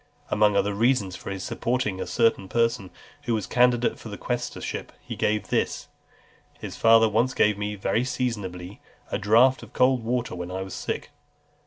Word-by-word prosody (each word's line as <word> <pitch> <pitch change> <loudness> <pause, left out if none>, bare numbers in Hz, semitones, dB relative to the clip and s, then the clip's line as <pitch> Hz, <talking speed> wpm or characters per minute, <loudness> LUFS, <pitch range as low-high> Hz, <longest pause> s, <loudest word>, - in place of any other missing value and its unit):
Among 105 -1 +3
other 100 0 +1
reasons 110 -3 +1
for - - -8
his 95 -1 -5
supporting 110 -6 -2
a - - -4
certain 115 -4 +1
person 115 -4 0 0.4
who 115 - +1
was 105 - -2
candidate 125 -1 +2
for 110 - -9
the 100 - -7
quaestorship, 120 -1 -4
he - - -7
gave 105 -2 0
this: - - -1 0.7
"His - - -7
father," 115 0 +6
said 110 - 0
he, - - -8
"once 125 +3 +2
gave 105 0 +3
me, 105 +1 -3
very 100 +4 0
seasonably, 105 -8 -4 0.3
a - - -1
draught 120 +6 +4
of 115 +1 -13
cold 125 -1 +3
water 120 +1 -1
when 90 0 -5
I 95 +1 -4
was 95 - -8
sick." - - -4
110 Hz, 185 wpm, -25 LUFS, 100-120 Hz, 0.7 s, father